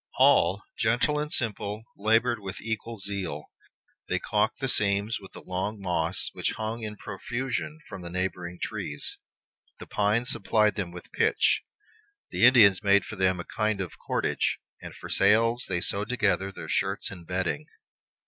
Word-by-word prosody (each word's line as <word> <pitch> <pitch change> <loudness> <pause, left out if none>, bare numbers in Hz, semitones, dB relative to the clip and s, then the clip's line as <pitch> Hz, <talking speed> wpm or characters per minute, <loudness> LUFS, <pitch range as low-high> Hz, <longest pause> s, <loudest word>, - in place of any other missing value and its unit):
All, 100 +2 +4 0.2
gentle 120 +7 +2
and 150 0 -3
simple, 105 -5 -1
labored 115 +3 +2
with 100 -1 -7
equal 115 +1 -4
zeal. 95 -7 -4 0.6
They - - +1
calked 105 +1 0
the 135 - -1
seams 105 -1 +2
with 95 -2 -13
the - - -10
long 95 +4 -3
moss 85 -4 0
which - - -1
hung 110 +1 -4
in 105 -1 -5
profusion 125 +9 -4
from 95 - -8
the 85 - -7
neighboring 90 -1 -3
trees; 75 0 -3 0.6
the - - -8
pines 110 +4 +1
supplied 105 -4 +2
them 95 -5 -3
with 90 0 -11
pitch; - - +2 0.7
the 120 - +6
Indians 110 -7 +7
made 100 -1 +4
for - - -7
them 95 -2 +2
a 85 - -5
kind 105 -1 +1
of 95 -3 -5
cordage; - - 0 0.2
and - - -9
for - - -9
sails 115 +3 +3
they 90 -2 0
sewed 100 +3 +1
together 95 -6 +1
their 85 -4 -8
shirts 95 +4 0
and 85 -4 -10
bedding. 95 - -2
105 Hz, 160 wpm, -27 LUFS, 95-115 Hz, 0.7 s, Indians